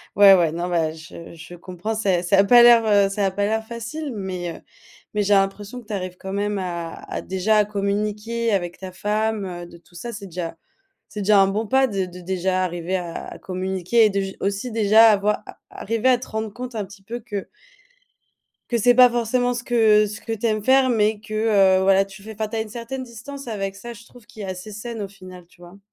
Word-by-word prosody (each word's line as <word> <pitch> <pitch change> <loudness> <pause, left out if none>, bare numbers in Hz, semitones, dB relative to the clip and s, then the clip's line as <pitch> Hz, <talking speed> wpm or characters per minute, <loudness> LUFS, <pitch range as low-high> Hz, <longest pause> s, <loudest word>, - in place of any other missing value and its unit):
ouais, 200 -1 +8
ouais, 170 -4 +3
non, 170 +2 -3
bah, 165 -3 0
je 165 +1 -11
je 160 +2 -12
comprends, 180 +5 -5
c'est 195 -5 0
ça 195 +2 +3
a - - +7
pas 240 +3 +7
l'air, 235 -1 +7
heu, 200 -2 +4
ça 195 0 0
a - - -1
pas 200 +1 -1
l'air 220 +1 -1
facile, 245 +6 -6
mais, 185 -3 -4
heu, - - -16 0.5
mais 210 - +1
j'ai 205 +1 +1
l'impression 200 +4 0
que 225 - -19
tu 210 - -5
arrives 185 -1 -5
quand 190 +1 -6
même 205 0 -1
à 170 -3 -4 0.2
à - - -4
déjà, 190 +3 0
à 210 - +4
communiquer 210 +3 -2
avec 175 -3 -1
ta 185 -1 -9
femme, 210 +1 -1
heu, 175 -1 -7
de 170 - -14
tout 175 - -26
ça, 235 +7 -7
c'est 205 -2 -8
déjà 170 -2 -5 0.5
c'est 210 - -7
déjà 200 0 +5
un 195 - +5
bon 210 +3 -2
pas 265 0 +4
de 195 -5 -2
de 180 0 -11
déjà 185 +1 -1
arriver 175 +1 -2
à 175 -2 -6
communiquer 190 +4 +1
et - - +1
de 200 0 -1
j 195 0 -5
aussi 200 +5 -2
déjà 220 +1 +6
à 210 - +5
voir, 210 +1 0
à - - -12 0.2
arriver 230 +4 0
à 250 - +4
te 255 - -10
rendre 220 -1 -4
compte 250 0 -7
un 210 -2 -2
petit 195 0 -15
peu 235 +4 -6
que 205 -4 -6 1.2
que 240 - +1
c'est 245 +2 +4
pas 250 0 +8
forcément 245 +1 0
ce 240 - -5
que 220 -3 +4
ce 215 +2 -7
que 225 - -5
tu 225 - -10
aimes 215 -2 0
faire, 260 +1 +4
mais 215 -2 +1
que, 215 0 -12 0.5
heu, 190 - 0
voilà 195 0 +4
tu 195 0 -14
fait, 220 +1 -9
enfin, 215 +1 -3
tu 225 - -5
as - - 0
une 220 - -4
certaine 240 +4 -6
distance 255 +2 -9
avec 195 -3 -3
ça, 235 +4 -9
je 230 - -14
trouve, 245 -3 -18
qui 215 - -11
est - - -5
assez 185 +3 -7
saine 225 +2 -6
au 200 - -4
final, 185 -3 -13
tu 175 0 -22
vois? 175 +3 -14
205 Hz, 245 wpm, -22 LUFS, 190-225 Hz, 1.2 s, ouais